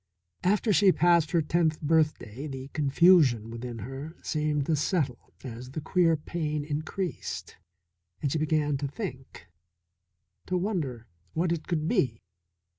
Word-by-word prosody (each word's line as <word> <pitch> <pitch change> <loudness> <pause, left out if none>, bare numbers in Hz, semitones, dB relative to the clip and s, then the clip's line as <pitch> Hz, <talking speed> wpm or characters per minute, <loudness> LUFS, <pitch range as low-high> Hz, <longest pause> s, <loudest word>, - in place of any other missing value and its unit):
After 210 +3 +3
she 195 0 +6
passed 170 -2 +4
her 170 -2 +2
tenth 160 0 +1
birthday 150 -5 0
the 135 -1 -7
confusion 145 - +4
within 120 0 -6
her 135 - -7
seemed 150 -2 0
to 160 - +2
settle 145 -5 -1
as 125 0 -7
the 140 - -5
queer 165 +1 +2
pain 150 -1 -3
increased, 155 +5 -4 0.6
and 140 - -1
she 160 - 0
began 150 -2 +1
to 140 +1 -2
think, 135 - -7 1.0
to 185 - 0
wonder 160 - -2 0.3
what 170 +1 0
it 170 -2 -2
could 155 -2 -1
be. 115 -8 +1
150 Hz, 135 wpm, -28 LUFS, 135-170 Hz, 1.0 s, she